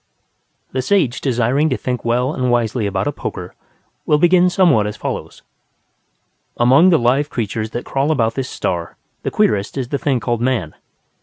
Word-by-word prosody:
The 130 - -1
sage 145 -5 +1
desiring 130 +4 +1
to 130 - -1
think 125 -2 -3
well 125 +4 0
and 125 -3 -1
wisely 120 -2 0
about 95 -1 -2
a - - 0
poker - - -6 0.5
will 150 - +4
begin 175 +3 +4
somewhat 165 - +3
as 105 - -6
follows: - - -6 1.1
Among 130 +9 +5
the 170 - +5
live 135 +3 +1
creatures 110 -2 -3
that 120 - -5
crawl 140 +2 -1
about 115 -7 +1
this 130 -1 -4
star 85 -2 -3 0.2
the - - -2
queerest 100 +4 0
is 130 -3 -3
the 140 - -2
thing 135 -4 0
called 120 +1 -2
Man. 120 -11 -1
125 Hz, 170 wpm, -18 LUFS, 115-145 Hz, 1.1 s, Among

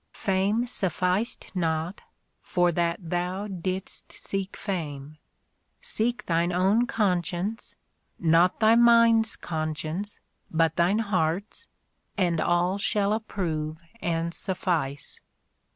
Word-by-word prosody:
Fame 200 +4 +1
sufficed 190 0 -1
not, 165 +1 -1 0.4
for 175 -1 +2
that 170 0 -1
thou 180 +3 -1
didst 190 -1 -5
seek 195 0 -4
fame: 150 -5 -5 0.6
seek 235 +2 -1
thine 170 +1 +1
own 195 +7 +3
con 185 -7 +1
science 185 +7 -4 0.4
(not 170 +2 +3
thy 220 0 +6
mind's 230 -1 +5
conscience, 155 +5 -4 0.3
but 165 -1 +2
thine 180 +4 +3
heart's), 195 -2 -1 0.5
and 175 -4 +2
all 175 +3 +1
shall 205 0 +1
approve 165 -8 -3 0.2
and 170 0 -1
suffice." 170 -9 -2
180 Hz, 105 wpm, -27 LUFS, 165-205 Hz, 0.6 s, thy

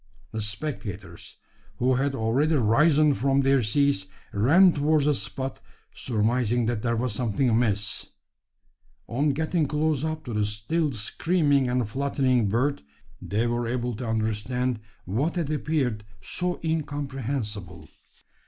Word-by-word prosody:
The 110 - -3
spectators, 105 - -6 0.4
who 130 +1 +2
had 135 +2 0
already 135 +7 +1
risen 145 +5 +4
from 135 +1 +2
their 135 -1 +3
seats, 115 -2 +1 0.3
ran 160 - +6
towards 150 0 +2
the 150 - +4
spot 130 +3 -3 0.3
surmising 120 +1 0
that 115 -2 -1
there 115 0 0
was 120 0 -1
something 120 +3 0
amiss. 105 -3 +1 1.0
On 140 +6 0
getting 155 +2 0
close 150 -1 0
up 155 0 -3
to 120 - -5
the 105 0 +1
still 110 +10 -1
screaming 140 - +1
and 125 -2 0
fluttering 130 -2 +1
bird, 130 +7 0 0.4
they 110 +4 -1
were 120 0 -1
able 120 0 -2
to 125 - -5
understand 110 +3 -1 0.3
what 130 - -1
had 165 -4 -1
appeared 145 -8 -1 0.2
so 180 - -3
incomprehensible. 135 - -3
125 Hz, 130 wpm, -26 LUFS, 110-145 Hz, 1.0 s, ran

